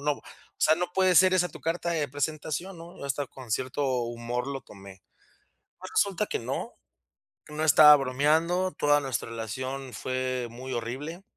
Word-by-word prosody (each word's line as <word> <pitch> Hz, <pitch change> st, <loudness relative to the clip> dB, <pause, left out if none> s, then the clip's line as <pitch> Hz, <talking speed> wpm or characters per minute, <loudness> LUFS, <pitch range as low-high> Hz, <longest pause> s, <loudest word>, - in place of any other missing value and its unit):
no, 150 Hz, +1 st, +1 dB
o -, -, -19 dB, 0.4 s
sea, 155 Hz, -, +5 dB
no 175 Hz, +1 st, -2 dB
puede 185 Hz, -1 st, +3 dB
ser 185 Hz, +1 st, +6 dB
esa 180 Hz, -1 st, +2 dB
tu -, -, -12 dB
carta 170 Hz, +1 st, -2 dB
de 155 Hz, -4 st, -1 dB
presentación, 155 Hz, +5 st, -3 dB
¿no? 170 Hz, +1 st, -12 dB
Yo -, -, -8 dB
hasta 140 Hz, +1 st, -2 dB
con 130 Hz, -2 st, -12 dB
cierto 130 Hz, +6 st, -1 dB, 0.2 s
humor 120 Hz, +1 st, -4 dB
lo 135 Hz, -2 st, -5 dB
tomé. 95 Hz, -3 st, -14 dB, 0.8 s
Pues, 185 Hz, +1 st, -9 dB
resulta 200 Hz, +1 st, +2 dB
que -, -, -2 dB
no, 125 Hz, +3 st, -4 dB, 0.7 s
que -, -, -13 dB
no 155 Hz, +1 st, -1 dB
estaba 150 Hz, -1 st, +9 dB
bromeando, 155 Hz, +7 st, +1 dB
toda 145 Hz, 0 st, +4 dB
nuestra 135 Hz, -4 st, -3 dB
relación 130 Hz, +4 st, -5 dB
fue 130 Hz, -1 st, -2 dB
muy 130 Hz, +3 st, -8 dB
horrible. 130 Hz, +9 st, -5 dB
145 Hz, 175 wpm, -27 LUFS, 125-165 Hz, 0.8 s, estaba